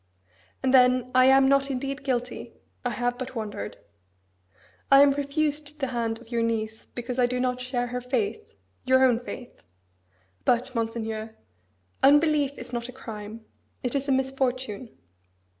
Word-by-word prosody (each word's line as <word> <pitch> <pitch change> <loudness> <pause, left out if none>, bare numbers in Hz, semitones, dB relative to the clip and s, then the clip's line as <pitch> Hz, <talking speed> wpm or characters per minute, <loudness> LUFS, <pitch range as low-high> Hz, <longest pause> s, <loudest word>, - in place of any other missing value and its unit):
And 260 0 +2
then, 255 -1 +5
I 255 0 +6
am 265 0 +6
not 275 0 +3
indeed 275 +1 -3
guilty: 250 -2 -3 0.3
I 245 - 0
have 245 +1 -2
but 255 0 -6
wandered. 210 - -5 1.1
I 275 +1 +9
am 285 - +5
refused 295 +1 -2
the 275 - 0
hand 230 -1 -1
of 235 0 -17
your 235 -1 +1
niece 220 -1 -2
because 245 +1 -4
I 245 - +4
do 250 +1 -2
not 250 0 -1
share 250 -1 -1
her 250 +1 -4
faith 255 - -2 0.3
your 260 0 +4
own 245 -3 +3
faith. 245 0 -9 0.8
But, 250 +2 +1
Monseigneur, 225 -1 -3 0.7
unbelief 290 0 +4
is 245 +1 -9
not 240 0 -3
a - - -6
crime, 220 -3 -9 0.4
it 250 - -1
is 280 0 -1
a - - +1
misfortune. 260 -3 -1
250 Hz, 155 wpm, -26 LUFS, 235-270 Hz, 1.1 s, I